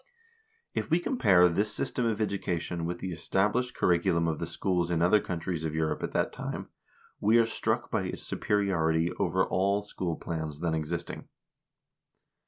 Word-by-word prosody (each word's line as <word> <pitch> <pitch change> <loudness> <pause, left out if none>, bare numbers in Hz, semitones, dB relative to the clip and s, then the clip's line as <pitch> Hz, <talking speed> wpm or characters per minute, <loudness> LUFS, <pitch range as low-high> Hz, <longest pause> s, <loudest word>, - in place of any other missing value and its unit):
If - - -2
we 165 +2 +4
compare 100 - +4
this 100 +5 +1
system 120 -2 -1
of 110 -2 -1
education 90 -5 -2
with 85 +1 -3
the 95 - -3
established 105 +9 0
cur - - +1
riculum 85 0 +1
of 80 -2 -1
the 85 - -3
schools 90 0 0
in 85 -2 +1
other 90 +5 +4
countries 85 -1 -3
of 80 -1 -2
Europe 80 -1 0
at - - -3
that - - 0
time, - - -5 0.5
we 110 +3 +4
are 115 - +5
struck 115 - -1
by - - 0
its - - -4
superiority 85 -5 +1
over 95 +1 +2
all 100 +2 +1
school 90 -4 -3
plans 80 -4 -5
then 85 -2 0
existing. 80 +2 -4
90 Hz, 170 wpm, -29 LUFS, 85-100 Hz, 0.5 s, are